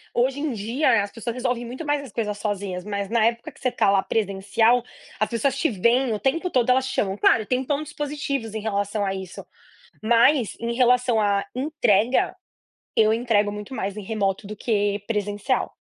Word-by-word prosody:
hoje 260 +3 +1
em 300 0 -1
dia 230 +1 +1
as 200 - -6
pessoas 230 +1 -5
resolvem 250 -1 -1
muito 255 +7 -7
mais 290 -1 0
as 275 -5 -10
coisas 210 -1 -2
sozinhas, 200 -3 -3
mas 200 0 -3
na 230 -1 +2
época 235 +6 -1
que - - -21
você 255 - +1
está 215 -5 +2
lá 195 -1 +3
presencial, 220 +4 +1 0.4
as 215 - +1
pessoas 240 +3 0
te 320 - +1
veem, 235 +4 +2
o 210 - -2
tempo 330 - 0
todo 250 -6 +1
elas 260 +1 +2
chamam, 200 -7 -1
claro, 220 +1 +3
tem 255 +4 0
pontos 295 +2 -3
positivos 280 -6 -3
em 220 - -3
relação 205 -1 -1
a 195 - -1
isso, 190 -2 -7 0.6
mas 235 +2 +3
em 235 0 -2
relação 245 -2 +3
à 200 -1 +1
entrega, 250 -5 +1 0.6
eu 215 -1 +5
entrego 220 -3 +1
muito 210 +5 -7
mais 200 -4 -3
em 210 - -5
remoto 200 -2 -1
do 210 - -6
que 205 -2 0
presencial. 210 +3 -1
230 Hz, 190 wpm, -24 LUFS, 205-255 Hz, 0.6 s, eu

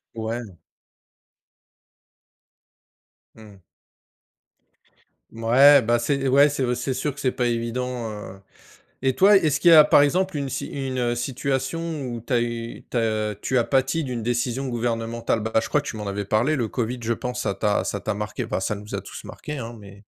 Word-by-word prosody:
Ouais. 115 +2 -3 2.9
Mmh. 105 -4 -15 1.7
Mouais, 130 +5 +6
bah, 120 +1 +2
c'est 140 +1 0
ouais, 140 +2 +6
c'est 140 -2 -2
au 125 -1 0
c'est 125 +2 -2
sûr 135 +3 -2
que 145 - -12
c'est 130 -3 +1
pas 125 -2 -1
évident, 120 0 -3
heu, 105 -2 -9 0.6
et 130 -1 +1
toi 200 +2 +6
est-ce 150 -7 +3
qu'il 175 - +6
y - - +9
a 155 - +10
par 145 - +5
exemple, 180 +3 +1
une 140 - -2
si - - -4
une, 135 -2 -4
heu, 120 -1 0
situation 135 +5 -2
où 120 -2 -5
tu 120 - -12
as 120 - +3
eu 115 0 -5
tu - - -2
as 110 -2 0
tu 130 - 0
as 120 - +3
pâti 135 +4 +1
d'une 120 -4 -4
décision 120 +2 -1
gouvernementale? 115 -1 -2
Bah, 110 +1 -4
je - - -4
crois 150 - +1
que - - -11
tu 110 - -5
m'en 105 -1 -5
avais 100 +1 -3
parlé. 115 +10 +1
Le 120 -5 -1
Covid 125 0 -3
je 115 - -1
pense 125 +1 -4
ça 100 - -1
t'a 105 +1 0
ça - - -3
t'a - - -2
marqué, 105 +1 -4
bah, - - -3
ça 105 - -1
nous 105 +1 -7
a - - -4
tous - - -10
marqué 150 0 -7
hein, 120 -2 -6
mais 100 -1 -14
120 Hz, 195 wpm, -23 LUFS, 115-135 Hz, 2.9 s, a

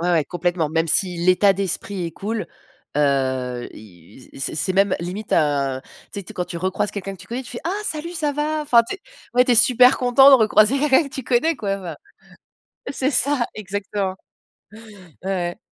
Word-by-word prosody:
Ouais, 175 +1 0
ouais, 165 -4 +2
complètement. 175 0 -2
Même 165 +2 -1
si 180 +2 +1
l'état 185 +3 +4
d'esprit 195 -1 -3
est - - -5
cool, 215 +5 -4 0.5
heu, 130 -4 0
i 105 +3 -16
c'est 135 - -2
c'est 160 +5 0
même 195 0 +2
limite, 185 +5 -6
heu, 140 -4 +1 0.3
tu - - -6
sais - - -5
tu - - -17
sais - - -10
quand 180 - -2
tu 175 - -7
recroises 190 +4 -2
quelqu'un 195 -1 -6
que 185 - -15
tu 185 - -12
connais, 240 +5 -5
tu 250 - -11
fais: 240 - -7
«Ah 335 - -1
salut, 335 -2 -4
ça 305 -4 -1
va?» 305 +2 -2
Enfin, 240 -5 +4
tu - - -3
es - - -33 0.3
ouais, 250 0 +5
tu 250 - +2
es - - +4
super 250 +2 +6
content 255 +2 +6
de - - +9
recroiser 220 +1 +4
quelqu'un 285 +1 +4
que 275 - -13
tu 265 - -4
connais, 265 +8 +1
quoi, 200 -4 -3
enfin. 175 -5 -8 1.0
C'est 270 -1 -1
ça, 280 -1 +2
exactement. 200 -1 -4 1.1
Ouais, 190 - -4
ouais. 175 -2 -3
195 Hz, 205 wpm, -21 LUFS, 170-250 Hz, 1.1 s, de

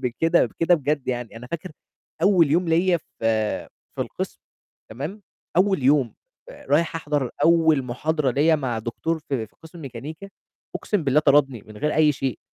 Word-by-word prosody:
بكده 165 +7 +2
بكده 170 +1 +2
بجد، 145 -2 -2
يعني 120 -2 -3
أنا 125 +2 -9
فاكر 170 +6 -6 0.5
أول 175 -6 +4
يوم 170 +3 +2
ليّا 175 +2 +3
في - - -7 1.0
في - - -4
القسم، - - -6 0.5
تمام؟ 150 - -6 0.3
أول 190 -4 +3
يوم، 135 -2 +3 0.3
فرايح 165 - -1
أحضر 145 -5 -2
أول 160 -4 +4
محاضرة 140 +3 -1
ليّا 155 +5 +3
مع 125 -6 -2
دكتور 140 +9 -3
في 135 -7 -4
في - - -32
قِسْم 165 +1 -12
ميكانيكا، 150 +8 -8 0.5
أقسم 205 -7 -1
بالله 140 +2 +3
طردني 140 -6 +3
من 110 - -12
غير 150 +7 -1
أي 155 -1 +4
شيء. 135 -4 -3
150 Hz, 160 wpm, -23 LUFS, 130-165 Hz, 1.0 s, أول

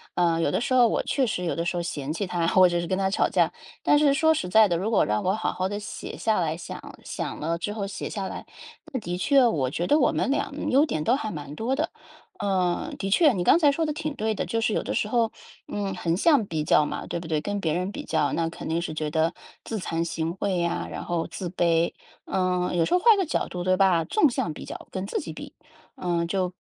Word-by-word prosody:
呃， 170 -2 +2
有 145 - +1
的 - - +1
时 255 - -1
候 250 -2 +6
我 - - 0
确 270 - +1
实 180 -6 -2
有 - - -1
的 165 - -1
时 175 +1 -1
候 - - 0
嫌 150 -4 -4
弃 190 +4 -2
他， 175 -2 -1
或 185 +1 +6
者 175 -1 0
是 170 - -4
跟 185 - 0
他 190 0 +1
吵 - - +1
架， - - +2 0.3
但 295 - +4
是 290 -2 +4
说 320 +3 +4
实 180 -12 -3
在 220 +2 +6
的， 175 - 0
如 200 +6 -2
果 220 - +4
让 105 0 0
我 185 +1 +2
好 220 - -1
好 185 +1 -1
地 205 +1 -3
写 210 - -7
下 220 -4 +1
来， 160 -1 -1
想 170 - -9
想 - - -5
了 165 +2 -1
之 205 +4 -3
后 205 -2 -3
写 195 - -5
下 195 -3 -4
来， - - -7 0.5
那 260 - -2
的 175 -3 -4
确， 270 +6 +4
我 140 - 0
觉 170 +6 -2
得 300 - +4
我 255 - +4
们 - - 0
两 280 +1 -1
优 280 +4 +5
点 155 - -2
都 245 - +4
还 220 -6 -3
蛮 145 -2 -7
多 240 +9 -1
的。 - - 0 0.5
呃， 190 - 0
的 195 - -2
确， 290 - +5
你 180 - -1
刚 180 - +6
才 295 -4 +5
说 325 +3 -1
的 305 - 0
挺 305 0 -4
对 220 -4 -1
的， - - -2
就 225 0 -1
是 220 - +1
有 - - 0
的 - - -3
时 - - 0
候， 230 0 +1 0.4
嗯， 195 -2 -3
横 165 -2 0
向 275 - +4
比 160 -4 -2
较 150 0 +4
嘛， - - -5
对 - - -3
不 170 - -8
对？ 155 -2 0
跟 205 +4 -3
别 160 -4 0
人 180 +3 -1
比 - - -7
较， - - +1
那 165 -1 0
肯 165 - -7
定 165 +1 +1
是 170 -2 -4
觉 155 -1 -2
得， 160 +2 +1 0.3
自 225 - -4
惭 165 -2 -2
形 165 +1 -3
秽 200 +1 -2
呀， 170 - -1
然 - - -5
后 170 -1 -1
自 180 -3 -5
卑。 170 -2 +2 0.3
嗯， 180 -1 0
有 165 - +3
时 - - -1
候 360 - +5
换 445 +1 +6
个 385 - +1
角 310 - -1
度 180 -1 -5
对 185 +1 +3
吧， 185 -4 +3
纵 310 - +3
向 170 -10 -2
比 - - -9
较， - - -8
跟 190 0 -4
自 - - -2
己 - - -6
比。 - - -9 0.4
嗯， 170 -2 -1
就 185 0 0
比 180 - -21
185 Hz, 290 characters per minute, -25 LUFS, 170-225 Hz, 0.5 s, 候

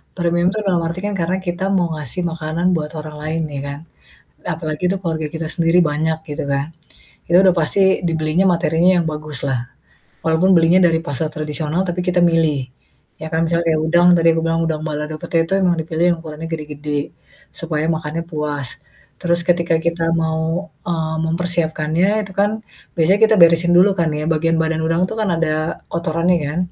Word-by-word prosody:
Premium 175 0 +1
itu 215 - -2
dalam 180 -3 +2
arti 170 +2 -3
kan 205 - -2
karena 175 +1 0
kita 175 0 -3
mau 175 -4 +1
ngasih 150 +4 -4
makanan 165 +1 -3
buat 150 -1 -4
orang 150 0 -8
lain, 160 +1 -2
ya 140 - -3
kan? 140 0 -6 0.7
Apalagi 155 -1 -4
itu 195 - 0
keluarga 160 -4 -2
kita 160 0 -4
sendiri 170 0 +2
banyak 160 +1 0
gitu 145 -1 -4
kan. 140 +3 -2 0.5
Itu 175 - +4
udah 185 -2 +5
pasti 190 +3 +2
dibelinya 160 +2 +1
materinya 170 0 +2
yang 170 - 0
bagus 150 -3 -6
lah. 125 -2 -2 0.5
Walaupun 165 +4 +2
belinya 165 +2 +5
dari 165 -2 +4
pasar 150 0 -2
tradisional 155 +2 -2
tapi 180 0 -2
kita 180 -1 +1
milih, 165 -4 +2 0.6
ya 160 - -4
kan. 160 +1 +1
Misalnya 170 +1 0
kayak 155 - 0
udang, 175 +2 +4
tadi 165 0 +3
aku 165 - 0
bilang 165 0 +1
udang 160 -2 -2
balado 150 0 -4
pete 165 -1 +1
itu 170 - -7
emang 180 -2 +2
dipilih 160 +1 -1
yang - - -8
ukurannya 160 +1 -7
gede-gede, 150 -2 -4 0.4
supaya 155 -2 -3
makannya 160 0 -3
puas. 150 -5 -4 0.4
Terus 170 -1 +1
ketika 170 -2 +2
kita 165 0 0
mau, 160 +3 -1 0.2
eee, 160 -2 -1
mempersiapkannya 165 0 0 0.2
itu 195 - -11
kan 205 +1 +3 0.5
biasanya 170 +4 +3
kita 220 0 +4
beresin 170 +1 +5
dulu 190 +3 +6
kan 165 -2 +2
ya, 150 0 -3
bagian 165 +1 +1
badan 160 0 -1
udang 165 +3 +1
itu - - -3
kan 215 -2 0
ada 155 -1 -1
kotorannya 170 +1 +1
kan, 150 +4 -3
165 Hz, 180 wpm, -19 LUFS, 155-175 Hz, 0.7 s, dulu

